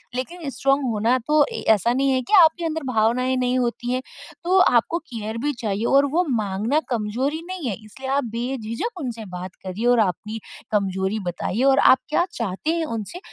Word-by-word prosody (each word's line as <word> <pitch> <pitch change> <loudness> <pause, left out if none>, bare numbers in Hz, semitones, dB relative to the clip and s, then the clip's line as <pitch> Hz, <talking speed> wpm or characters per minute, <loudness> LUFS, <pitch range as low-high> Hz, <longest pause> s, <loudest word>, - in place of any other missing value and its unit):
लेकिन 300 +4 -4
स्ट्राँग 275 +3 +1
होना 225 +4 +2
तो 300 - +2 0.2
ए - - -4
ऐसा 225 +3 +1
नहीं 270 +2 +1
है 260 -1 +2
कि 250 - -6
आपके 330 +1 +4
अंदर 320 -1 -2
भावनाएँ 250 +2 +1
नहीं 250 0 +1
होती 240 0 -2
है। 255 - -1 0.4
तो 370 +2 +3
आपको 290 +1 +3
केयर 230 -8 -6
भी 295 0 0
चाहिए 210 +1 -1
और 275 +2 +4
वो 355 +3 +2
माँगना 220 +3 0
कमज़ोरी 250 +7 -1
नहीं 365 -8 -4
है 205 - -1
इसलिए 265 +5 -8
आप 280 0 +2
बेझिझक 250 - -3
उनसे 230 -5 -5
बात 180 +1 -7
करिए। 190 +5 -4
और 245 - +4
अपनी 215 +3 -1 0.3
कमज़ोरी 190 0 0
बताइए 185 +6 -2
और 270 0 +5
आप 260 - +6
क्या 345 - +2
चाहते 230 - -2
हैं 330 -1 -1
उनसे 225 - -6
245 Hz, 190 wpm, -23 LUFS, 215-285 Hz, 0.4 s, आप